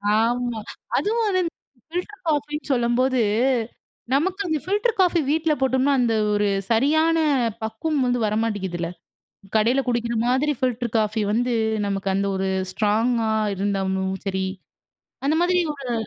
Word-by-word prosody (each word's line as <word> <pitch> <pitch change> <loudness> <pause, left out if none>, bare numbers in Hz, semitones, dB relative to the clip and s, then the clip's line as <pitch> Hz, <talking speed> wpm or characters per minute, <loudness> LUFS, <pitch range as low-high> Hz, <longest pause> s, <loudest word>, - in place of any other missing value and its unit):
ஆமா. 240 +1 0 0.4
அதுவும் 455 +3 +1
வந்து 370 -2 +2
இந்த 335 - -3 0.4
ஃபில்டர் 360 +5 -5
காஃபின்னு 300 0 -1
சொல்லம்போது, 250 +1 +2 0.9
நமக்கு 375 +8 +1
அந்த 315 -2 +1
ஃபில்டர் 415 +5 +1
காஃபி 350 -2 +3
வீட்ல 315 0 +2
போட்டோம்னா, 265 +1 +2
அந்த 230 -2 +2 0.2
ஒரு 205 0 +2 0.2
சரியான 315 +8 +3 0.5
பக்குவம் 265 +7 -1
வந்து 245 0 +1
வரமாட்டிக்குதுல! 205 -6 -1 0.7
கடையில 235 +5 +3
குடிக்கிற 235 -1 0
மாதிரி 265 +4 +2
ஃபில்டர் 245 -2 -1
காஃபி 215 0 0
வந்து, 245 +2 +1 0.3
நமக்கு 195 -1 -2
அந்த 200 +1 0
ஒரு 190 0 -1 0.2
ஸ்ட்ராங்கா 225 +2 +1 0.2
இருந்தாலும் 190 -1 -1
சரி 190 -1 -1 0.8
அந்த 300 - +3
மாரி 355 +1 +2 0.2
ஒரு 270 -4 -5
245 Hz, 125 wpm, -23 LUFS, 215-305 Hz, 0.9 s, காஃபி